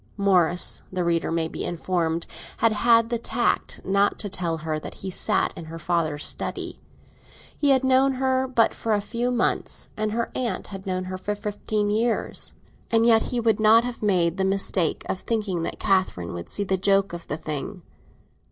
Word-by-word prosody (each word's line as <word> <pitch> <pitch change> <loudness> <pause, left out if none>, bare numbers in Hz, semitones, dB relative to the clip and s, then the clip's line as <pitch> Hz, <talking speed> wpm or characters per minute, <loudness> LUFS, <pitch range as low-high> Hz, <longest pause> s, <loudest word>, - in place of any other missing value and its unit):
Morris, 180 -3 +2
the 185 -1 -1
reader 170 -1 0
may 165 -1 0
be - - -5
informed, 170 -1 -1 0.3
had 230 0 +3
had 230 +1 +4
the 235 - 0
tact 235 +1 -1
not 200 +1 +2
to 205 - -3
tell 170 -3 -2
her 155 -1 -3
that - - -9
he 190 - -6
sat - - +1
in 165 - -8
her 165 +1 -8
father's 160 -3 -1
study. - - -2 0.8
He 290 - +1
had 270 -1 +4
known 265 +1 +4
her 260 0 +1
but 235 -3 +3
for 225 - -1
a 210 - +2
few 235 +4 -2
months, 245 -1 -1
and 215 0 -1
her 230 +1 -2
aunt 245 -2 -2
had 195 0 -9
known 185 0 -1
her 185 0 -6
for 210 +2 -2
fifteen 205 0 -2
years; 225 +2 0 0.3
and 230 0 +3
yet 225 -1 +6
he 245 - -1
would 225 -2 +2
not 220 +2 +6
have 245 -1 -5
made 180 -4 +2
the 190 - +1
mistake 190 -3 +1
of 185 - -2
thinking 205 -7 -2
that - - -3
Catherine 185 - 0
would 85 -1 -7
see 205 - -1
the 190 -1 0
joke 195 0 +2
of 170 -1 -7
the 150 - -3
thing. 160 +5 -5
200 Hz, 190 wpm, -24 LUFS, 175-230 Hz, 0.8 s, yet